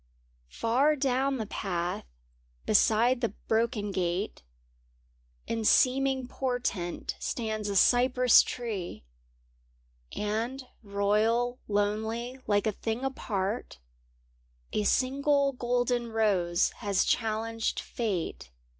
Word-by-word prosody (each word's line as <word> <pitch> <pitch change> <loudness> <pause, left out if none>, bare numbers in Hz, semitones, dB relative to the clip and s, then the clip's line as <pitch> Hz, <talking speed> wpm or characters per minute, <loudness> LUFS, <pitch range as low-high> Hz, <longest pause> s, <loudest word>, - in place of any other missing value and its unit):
Far 265 - +2
down 270 0 +1
the 220 - -3
path, 175 - -3 0.6
beside 240 - +3
the 230 -4 -1
broken 220 -2 0
gate, 185 +2 -2 1.0
In 225 -1 -2
seeming 265 +3 +3
portent 245 -10 -3
stands 215 -3 -3
a 200 - -2
cypress 250 +3 +5
tree; 215 - -5 1.1
And 230 +6 -2 0.2
royal, 215 +4 +1
lonely, 220 +5 -1
like 205 -1 +2
a 215 - +2
thing 225 +5 -3
apart, 215 - -3 1.0
A 210 - 0
single 280 +3 +2
golden 245 -1 0
rose 190 -6 +2
has 200 -4 +1
challenged 225 0 -1
Fate. 200 - -3
225 Hz, 95 wpm, -29 LUFS, 205-250 Hz, 1.1 s, cypress